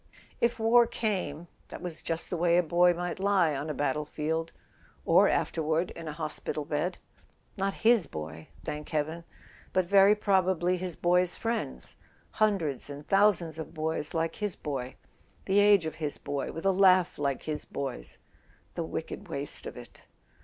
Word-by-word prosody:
If 235 0 +1
war 230 +1 +5
came, 180 -9 -2 0.2
that - - -8
was 175 -3 -6
just 165 0 -4
the - - 0
way 170 0 +3
a 180 - +4
boy 175 +2 +4
might 175 +1 -4
lie 190 -6 +3
on 145 +3 -4
a - - -1
battle 145 +1 0
field—or 160 +2 0
afterward 160 +2 0
in 165 -1 -8
a - - -3
hospital 150 -1 -4
bed. 155 +4 -2 0.6
Not 195 0 -1
his 225 -8 +5
boy, 80 +1 -7 0.2
thank 150 0 -5
heaven; 160 +2 -2 0.5
but 185 -1 +2
very 200 +2 +6
probably 185 -3 +2
his 180 -2 -4
boy's 180 0 +2
friends: 225 - -3 0.4
hundreds 170 -12 +1
and 145 +1 -8
thousands 190 -6 +3
of 160 +1 -7
boys 155 0 -2
like 165 0 -1
his 210 -4 -2
boy, 130 -4 -5 0.5
the 195 +1 +3
age 205 -4 +5
of 160 - -3
his 150 -2 -2
boy, 140 -1 -4
with 165 - -7
a 195 - +5
laugh 185 -3 +4
like 140 -2 -1
his 155 -1 -4
boy's... 130 - -6 0.6
The - - -3
wicked - - -6
waste - - -1
of - - -8
it! - - -12
170 Hz, 165 wpm, -29 LUFS, 150-190 Hz, 0.6 s, very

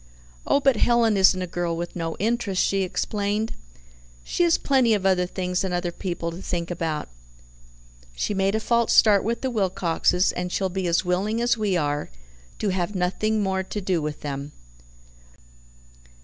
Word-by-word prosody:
"Oh, - - +4
but 270 -4 +3
Helen 235 -2 +3
isn't 190 -1 +4
a - - -2
girl 170 -1 -2
with 170 0 -5
no 165 -2 -3
interests," 220 -3 0
she 195 0 +1
explained. 205 +3 -1 0.7
"She - - -2
has 340 -1 +4
plenty 255 -5 +3
of 195 -2 -3
other 180 -2 +3
things 180 0 -2
and 185 -2 -1
other 175 0 -2
people 170 -2 -4
to 170 +3 -8
think 170 -2 -3
about. 160 -3 -3 1.1
She 205 - -1
made 195 +1 +1
a - - +1
false 235 +1 +1
start 205 -3 +6
with 230 +2 -2
the 260 - -1
Wilcoxes, 185 -3 +1
and 180 0 -4
she'll 190 0 0
be 185 0 -2
as 170 +2 +1
willing 195 +5 0
as 240 0 +2
we 210 -5 0
are 145 -2 -1 0.5
to 210 - -1
have 185 +1 -2
nothing 210 +4 0
more 190 -1 0
to 190 +2 -5
do 185 -4 0
with 150 0 -5
them." 140 0 -5
190 Hz, 175 wpm, -24 LUFS, 175-215 Hz, 1.1 s, start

